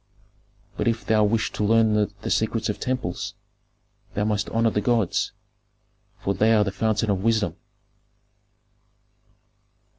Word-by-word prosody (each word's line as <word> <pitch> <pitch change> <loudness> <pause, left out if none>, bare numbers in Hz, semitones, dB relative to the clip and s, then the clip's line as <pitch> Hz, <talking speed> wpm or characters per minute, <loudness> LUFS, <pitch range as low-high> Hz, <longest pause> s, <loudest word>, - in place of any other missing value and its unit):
But - - -1
if 115 -1 0
thou 110 -1 +3
wish 105 +1 +1
to - - -3
learn 110 +1 +4
the 105 0 -1
secrets 110 0 0
of 105 - -3
temples, 125 -9 -3 0.8
thou 105 - +1
must 105 -1 -1
honor 115 0 +2
the 105 - 0
gods, 115 -6 +1 0.9
for 100 - -1
they 110 +3 +3
are 105 - +4
the 100 - -2
fountain 110 +1 0
of 95 -1 -1
wisdom." 110 -7 +1
110 Hz, 130 wpm, -24 LUFS, 105-115 Hz, 0.9 s, learn